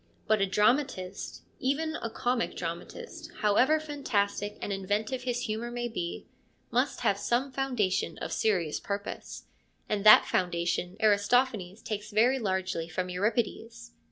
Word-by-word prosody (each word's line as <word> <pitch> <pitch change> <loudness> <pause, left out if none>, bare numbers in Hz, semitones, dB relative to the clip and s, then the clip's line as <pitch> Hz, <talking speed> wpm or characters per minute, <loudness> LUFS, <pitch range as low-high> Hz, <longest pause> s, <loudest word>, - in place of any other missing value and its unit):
But 215 -1 +3
a 195 - +3
dramatist, 210 -1 0 0.2
even 310 +4 0
a 230 - -4
comic 245 +1 -1
dramatist, 175 - -6
however 250 +9 +4
fantastic 210 -9 -1
and 200 - -3
inventive 210 +6 -2
his 245 -1 -1
humour 225 0 -3
may 240 0 -3
be, 175 -7 -4 0.5
must 250 +2 +1
have 200 -4 +2
some 245 +6 0
foundation 250 -8 0
of - - -5
serious 180 -8 +1
purpose, 200 0 -5 0.4
and 205 -2 -1
that 215 0 +9
foundation 175 +1 -1
Aristophanes 210 -1 +2
takes 210 0 -4
very 235 +5 +3
largely 190 -5 -2
from 180 +3 -3
Euripides. 215 - -2
215 Hz, 130 wpm, -29 LUFS, 195-245 Hz, 0.5 s, that